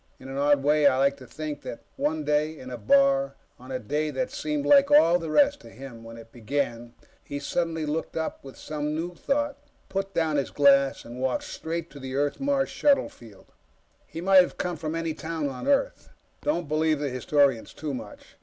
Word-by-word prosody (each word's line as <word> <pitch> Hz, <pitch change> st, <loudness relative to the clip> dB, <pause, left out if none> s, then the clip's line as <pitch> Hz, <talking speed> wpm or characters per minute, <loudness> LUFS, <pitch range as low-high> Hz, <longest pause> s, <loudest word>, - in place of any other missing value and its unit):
In 130 Hz, -, -11 dB
an 135 Hz, -, -5 dB
odd 145 Hz, -1 st, +3 dB
way, 150 Hz, 0 st, +4 dB
I 130 Hz, -2 st, +3 dB
like 140 Hz, +1 st, +3 dB
to 130 Hz, -2 st, -13 dB
think 150 Hz, -2 st, -6 dB
that -, -, -8 dB
one 155 Hz, +2 st, -1 dB
day, 150 Hz, +2 st, 0 dB
in 130 Hz, -2 st, -9 dB
a 125 Hz, -, -5 dB
bar, 275 Hz, 0 st, +3 dB, 0.2 s
on 130 Hz, +1 st, -11 dB
a 130 Hz, -, -1 dB
day 150 Hz, +6 st, -2 dB
that 255 Hz, -, -2 dB
seemed 300 Hz, -1 st, -2 dB
like 280 Hz, -1 st, +6 dB
all 175 Hz, -, +6 dB
the 165 Hz, -2 st, -5 dB
rest 285 Hz, -, +4 dB
to -, -, -14 dB
him 130 Hz, -4 st, -11 dB
when 115 Hz, 0 st, -10 dB
it 115 Hz, 0 st, -13 dB
began, 120 Hz, -1 st, -3 dB, 0.3 s
he 145 Hz, -, -6 dB
suddenly 160 Hz, +2 st, -2 dB
looked 155 Hz, +2 st, -3 dB
up 160 Hz, -, -3 dB
with 135 Hz, -3 st, -11 dB
some 150 Hz, 0 st, -4 dB
new 170 Hz, +3 st, -3 dB
thought, 280 Hz, +8 st, -1 dB, 0.3 s
put 195 Hz, 0 st, -3 dB
down 160 Hz, -3 st, +1 dB
his 140 Hz, -, -1 dB
glass, 140 Hz, -1 st, +3 dB
and 120 Hz, +2 st, -9 dB
walked 130 Hz, -1 st, 0 dB
straight 165 Hz, +1 st, -5 dB
to 145 Hz, -, -11 dB
the 130 Hz, 0 st, -6 dB
Earth 145 Hz, +1 st, 0 dB
Mars 275 Hz, -1 st, +1 dB
shuttle 285 Hz, -2 st, +2 dB
field. 110 Hz, -5 st, -16 dB, 0.6 s
He 165 Hz, -, -7 dB
might 190 Hz, +1 st, +7 dB
have 180 Hz, -, -3 dB
come 180 Hz, -1 st, -2 dB
from 155 Hz, 0 st, -4 dB
any 165 Hz, -1 st, -2 dB
town 160 Hz, -1 st, -3 dB
on 130 Hz, -2 st, -7 dB
Earth. -, -, +1 dB, 0.3 s
Don't 175 Hz, -, -1 dB
believe 155 Hz, +1 st, +1 dB
the 145 Hz, 0 st, -2 dB
historians 130 Hz, 0 st, +1 dB
too 150 Hz, -2 st, -5 dB
much. 125 Hz, -, -10 dB
150 Hz, 210 wpm, -26 LUFS, 135-175 Hz, 0.6 s, might